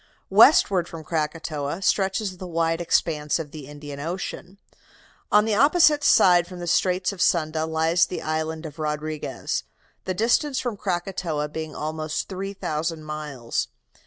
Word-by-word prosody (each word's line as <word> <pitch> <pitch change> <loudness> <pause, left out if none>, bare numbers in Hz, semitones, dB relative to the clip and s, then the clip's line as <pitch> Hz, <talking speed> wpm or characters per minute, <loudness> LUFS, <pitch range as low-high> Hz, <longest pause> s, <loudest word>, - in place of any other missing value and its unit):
"Westward 195 - +6
from 165 -1 -9
Krakatoa 155 +1 -3
stretches 195 0 0
the 185 - -7
wide 165 0 0
expanse 155 -3 +1
of 155 -3 -6
the 150 -4 -9
Indian 145 -1 -9
Ocean. 180 +4 -5 0.7
On 210 +1 +5
the 220 - 0
opposite 295 +5 +5
side 175 -8 +5
from 180 - -9
the 175 - -6
Straits 180 +2 +1
of 185 - -7
Sunda 160 -1 +1
lies 165 +2 +2
the 180 - -5
island 160 +1 -2
of 155 0 -9
Rodriguez, 155 0 -3 0.4
the 185 - -2
distance 250 - +2
from 245 -4 -3
Krakatoa 175 -5 -2
being 155 0 -6
almost 155 0 -3
three 195 +1 -5
thousand 155 -3 -3
miles. 150 -6 -4
165 Hz, 145 wpm, -24 LUFS, 155-190 Hz, 0.7 s, Westward